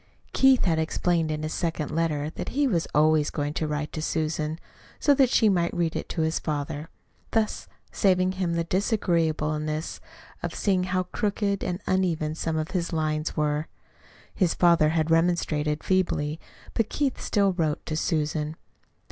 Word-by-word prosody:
Keith 265 -1 +5
had 165 -3 +2
explained 165 0 0
in 155 0 -2
his 155 - -3
second 165 -3 -2
letter 155 -2 -1
that - - -5
he 285 +2 +1
was 180 -11 +1
always 155 0 +3
going 145 -1 -2
to 155 - -1
write 150 0 -3
to 155 - -3
Susan, 155 0 -1 0.4
so 290 - +4
that 270 -3 +4
she 225 - +4
might 175 -4 +1
read 170 -2 0
it - - -4
to 165 - -2
his 160 +1 +1
father, 150 0 -3 0.4
thus 220 -1 0 0.2
saving 185 -2 +2
him 185 -2 -1
the 170 - +1
disagreeableness 160 -5 0 0.4
of - - -4
seeing 185 -3 +1
how 185 0 0
crooked 200 +1 -1
and 180 0 -2
uneven 165 -5 0
some 160 0 -2
of 155 +3 -2
his 175 -3 -1
lines 155 -1 -1
were. 150 0 0 0.7
His 180 -4 +1
father 170 -3 +4
had 160 0 0
remonstrated 160 -3 +1
feebly; 160 -5 0 0.3
but 225 -2 0
Keith 280 -3 -1
still 200 -2 +2
wrote 160 -4 -1
to 155 - -3
Susan. 155 -1 -1
165 Hz, 165 wpm, -26 LUFS, 155-185 Hz, 0.7 s, Keith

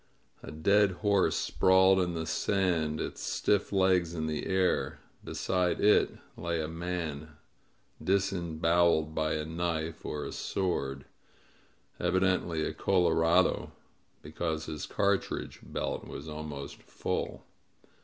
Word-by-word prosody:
A - - -9
dead 100 +5 +3
horse 100 -2 +3
sprawled 95 +1 +4
in 90 -2 0
the 80 0 -2
sand, 80 -5 0
its - - -4
stiff 105 -1 0
legs 95 -3 +2
in 80 -1 -2
the 75 -1 -3
air; 95 -1 +1 0.2
beside 90 -2 0
it 105 - +4 0.2
lay 85 0 -2
a 80 - -2
man, 85 +1 -3
90 70 - -6
MEESTER'S 80 +1 -13 0.7
FLIGHT - - -12
disemboweled 85 -4 +2
by 80 0 0
a 75 0 -2
knife 80 -1 -3
or 75 -1 -4
a - - -5
sword 70 -8 -2 0.5
— - - -35
evidently 90 -4 +1
a - - -3
colo^ 90 -3 +2
radoy 85 +3 +3 0.5
because 80 0 -3
his 75 - -5
cartridge 100 -1 -1
belt - - -4
was 70 - -8
almost 75 -2 -7
full. - - -4
85 Hz, 135 wpm, -30 LUFS, 80-95 Hz, 0.7 s, sprawled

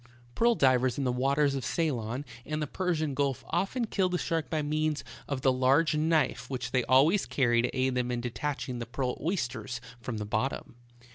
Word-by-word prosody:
Pearl 235 - +3
divers 130 - +3
in 140 - -1
the 125 - +1
waters 140 +3 +2
of 135 -2 -3
Ceylon 130 -5 -1 0.2
and 155 +3 -3
the 150 - -1
Persian 160 -2 -1
Gulf 140 -1 -1
often 215 +7 0
kill 190 -4 +1
the 180 - 0
shark 165 -3 -2
by 155 -2 0
means 155 0 0 0.2
of 140 -2 -3
the 130 - +4
large 135 +5 +3
knife 150 -5 +1
which 130 -2 -4
they 130 -2 +2
always 150 +10 +4
carry 120 -3 +2
to 125 - 0
aid 130 0 +2
them 125 -1 0
in 120 -1 -1
detaching 125 +1 -3
the 115 - -5
pearl 125 +1 -2
oysters 125 - -2 0.2
from 120 -1 -5
the 105 - -3
bot 110 +5 0
tom. - - -8
135 Hz, 200 wpm, -29 LUFS, 125-155 Hz, 0.2 s, the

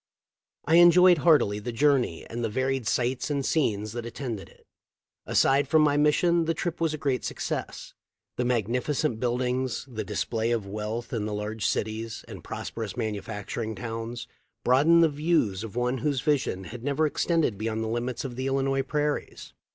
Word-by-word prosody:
I 165 +2 +4
enjoyed 175 0 +7
heartily 145 -11 +4
the 120 +4 -5
journey 130 - +1
and 120 +1 -5
the 115 - 0
varied 130 +1 -1
sights 125 +6 0
and 140 -2 -1
scenes 105 -9 0
that 120 +1 -5
attended 115 -3 -6
it. - - -23 0.6
Aside 135 +1 +3
from 155 +2 +4
my 145 -1 +3
mission, 165 +3 +3
the 165 0 0
trip 170 +1 -3
was 160 -2 +1
a - - -6
great 135 -4 -1
success. - - -4 0.4
The 125 - -1
magnificent 125 +3 0
buildings, 125 +1 -1
the 110 -4 -5
display 115 +3 -2
of 115 -4 0
wealth 105 +4 -5
in 110 -3 -1
the 105 - -3
large 105 0 -2
cities 110 +1 -3
and - - -10
prosperous 115 -1 -6
manufacturing 110 0 -4
towns, 115 +3 -5 0.4
broadened 155 +7 +5
the - - +6
views 145 - 0
of 115 -1 -8
one 125 +1 0
whose 140 0 0
vision 140 -10 0
had 115 +6 -9
never 145 +3 +1
extended 155 - +1
beyond 110 0 -2
the - - -3
limits 120 +3 -3
of 125 -2 -5
the 130 +2 -3
Illinois 135 0 +1
prairies. 150 +2 -3
125 Hz, 170 wpm, -27 LUFS, 110-145 Hz, 0.6 s, enjoyed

